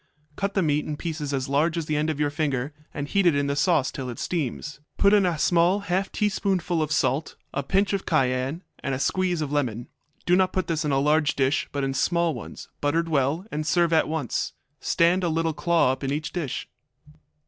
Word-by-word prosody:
Cut 200 Hz, +3 st, -2 dB
the 190 Hz, -, +3 dB
meat 150 Hz, -1 st, +1 dB
in 150 Hz, -, -3 dB
pieces 155 Hz, -3 st, -4 dB
as 130 Hz, -2 st, -1 dB
large 155 Hz, +5 st, +1 dB
as 165 Hz, -, -2 dB
the 155 Hz, -, -1 dB
end 150 Hz, +1 st, +1 dB
of 155 Hz, -2 st, -2 dB
your 145 Hz, -1 st, +1 dB
finger, 145 Hz, -2 st, -1 dB, 0.2 s
and 145 Hz, -1 st, -4 dB
heat 195 Hz, +3 st, +2 dB
it 165 Hz, -, +4 dB
in 140 Hz, 0 st, +1 dB
the 140 Hz, 0 st, -1 dB
sauce 150 Hz, -3 st, +2 dB
till 130 Hz, -2 st, -5 dB
it 120 Hz, -, -6 dB
steams. 150 Hz, -3 st, -3 dB, 0.2 s
Put 200 Hz, +1 st, +4 dB
in 200 Hz, -3 st, +5 dB
a 170 Hz, -3 st, 0 dB
small 175 Hz, +5 st, +3 dB
half 190 Hz, 0 st, -1 dB
teaspoonful 190 Hz, -4 st, 0 dB
of 155 Hz, -1 st, -1 dB
salt, 145 Hz, 0 st, 0 dB, 0.2 s
a 140 Hz, -, -1 dB
pinch 195 Hz, +8 st, +1 dB
of 195 Hz, -, -2 dB
cayenne, 135 Hz, +2 st, 0 dB, 0.2 s
and 135 Hz, -1 st, -2 dB
a -, -, -4 dB
squeeze 180 Hz, +2 st, 0 dB
of 145 Hz, -2 st, -3 dB
lemon. 120 Hz, -6 st, -1 dB, 0.4 s
Do 180 Hz, -, +4 dB
not 185 Hz, 0 st, +2 dB
put 185 Hz, -, 0 dB
this 165 Hz, -1 st, -1 dB
in 150 Hz, -, 0 dB
a 135 Hz, -, +2 dB
large 150 Hz, +1 st, +2 dB
dish, 135 Hz, +1 st, +1 dB
but 140 Hz, -1 st, -2 dB
in 135 Hz, 0 st, -1 dB
small 170 Hz, +3 st, +1 dB
ones, 120 Hz, -, -8 dB
buttered 165 Hz, +3 st, +1 dB
well, 150 Hz, +4 st, +1 dB
and 155 Hz, -, -2 dB
serve 170 Hz, +1 st, +2 dB
at 160 Hz, -, +4 dB
once. 155 Hz, -6 st, -2 dB, 0.3 s
Stand 175 Hz, +2 st, +2 dB
a 175 Hz, -, +1 dB
little 165 Hz, 0 st, 0 dB
claw 170 Hz, -4 st, +2 dB
up 130 Hz, -, -5 dB
in 135 Hz, -, -1 dB
each 145 Hz, 0 st, -3 dB
dish. 160 Hz, -8 st, -3 dB
155 Hz, 225 wpm, -25 LUFS, 140-175 Hz, 0.4 s, in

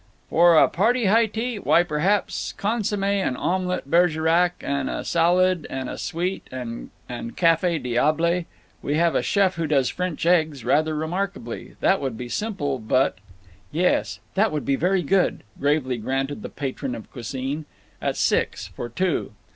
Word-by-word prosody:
"For 170 Hz, 0 st, +6 dB
a -, -, +7 dB
party 230 Hz, +7 st, +1 dB
high 225 Hz, +4 st, +4 dB
tea? 225 Hz, +1 st, -3 dB
Why, 175 Hz, -, +4 dB
perhaps 175 Hz, +5 st, 0 dB
consomme 205 Hz, -1 st, -1 dB
and 195 Hz, -9 st, 0 dB
omelet 180 Hz, -3 st, -1 dB
Bergerac 170 Hz, +2 st, +3 dB
and 140 Hz, -1 st, -2 dB
a -, -, -4 dB
salad 175 Hz, 0 st, +2 dB
and 130 Hz, -1 st, -4 dB
a -, -, -5 dB
sweet 180 Hz, +3 st, -3 dB
and 125 Hz, -2 st, -6 dB, 0.5 s
cafe 165 Hz, 0 st, +3 dB
diable. 155 Hz, +7 st, +1 dB, 0.4 s
We 145 Hz, -, -1 dB
have 170 Hz, +1 st, +3 dB
a -, -, +2 dB
chef 190 Hz, -3 st, +1 dB
who 165 Hz, -1 st, -1 dB
does 135 Hz, -4 st, +2 dB
French 180 Hz, -3 st, -3 dB
eggs 155 Hz, -7 st, +2 dB
rather 155 Hz, +5 st, +2 dB
remarkably. 190 Hz, +7 st, -4 dB
That 190 Hz, -, +3 dB
would 130 Hz, -5 st, -3 dB
be 125 Hz, 0 st, -6 dB
simple, 145 Hz, -, -2 dB
but—" 110 Hz, -3 st, +1 dB, 0.5 s
"Yes, 175 Hz, +4 st, +1 dB
that 210 Hz, +2 st, +2 dB
would 150 Hz, -5 st, -3 dB
be 135 Hz, -, +2 dB
very 180 Hz, +4 st, +1 dB
good," 185 Hz, +5 st, +1 dB, 0.2 s
gravely 140 Hz, -3 st, +1 dB
granted 135 Hz, +5 st, -2 dB
the -, -, -6 dB
patron 135 Hz, -2 st, -4 dB
of 110 Hz, -, -10 dB
cuisine. 135 Hz, +5 st, -4 dB, 0.4 s
"At -, -, -1 dB
six; -, -, 0 dB
for 120 Hz, -, -6 dB
two." 170 Hz, -, -1 dB
165 Hz, 155 wpm, -24 LUFS, 140-185 Hz, 0.5 s, a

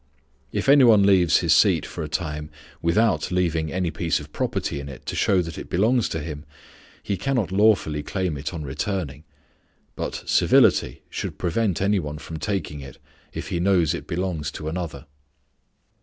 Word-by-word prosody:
If -, -, -2 dB
any 140 Hz, 0 st, +7 dB
one 110 Hz, -5 st, +6 dB
leaves 95 Hz, -5 st, +4 dB
his -, -, +3 dB
seat -, -, +4 dB
for 85 Hz, -, -6 dB
a 75 Hz, -, -6 dB
time 75 Hz, -2 st, -3 dB, 0.3 s
without 100 Hz, +5 st, +2 dB
leaving 85 Hz, -4 st, 0 dB
any 90 Hz, -2 st, -1 dB
piece 80 Hz, +1 st, -1 dB
of 75 Hz, 0 st, -12 dB
property 70 Hz, -, -2 dB
in 70 Hz, 0 st, -7 dB
it 65 Hz, -, -11 dB
to -, -, -4 dB
show 95 Hz, -3 st, +2 dB
that 85 Hz, 0 st, -7 dB
it -, -, -9 dB
belongs 110 Hz, +6 st, +2 dB
to 80 Hz, -, -3 dB
him, 75 Hz, -1 st, -6 dB, 0.6 s
he 100 Hz, -, -1 dB
cannot 120 Hz, -, -1 dB
lawfully 95 Hz, -7 st, +3 dB
claim 90 Hz, 0 st, -2 dB
it 70 Hz, +1 st, -4 dB
on 85 Hz, -4 st, -6 dB
returning; 75 Hz, +1 st, -4 dB, 0.7 s
but -, -, -4 dB
civility -, -, +3 dB
should -, -, -4 dB
prevent 95 Hz, +1 st, 0 dB
any 100 Hz, 0 st, +2 dB
one 75 Hz, -2 st, -5 dB
from 80 Hz, +1 st, -8 dB
taking 80 Hz, -5 st, -3 dB
it, 70 Hz, -2 st, -10 dB, 0.3 s
if -, -, -6 dB
he 85 Hz, -, -1 dB
knows 90 Hz, -4 st, +3 dB
it -, -, -6 dB
belongs 85 Hz, -4 st, -2 dB
to 75 Hz, -, -6 dB
another. 80 Hz, -4 st, -5 dB
85 Hz, 175 wpm, -24 LUFS, 75-95 Hz, 0.7 s, any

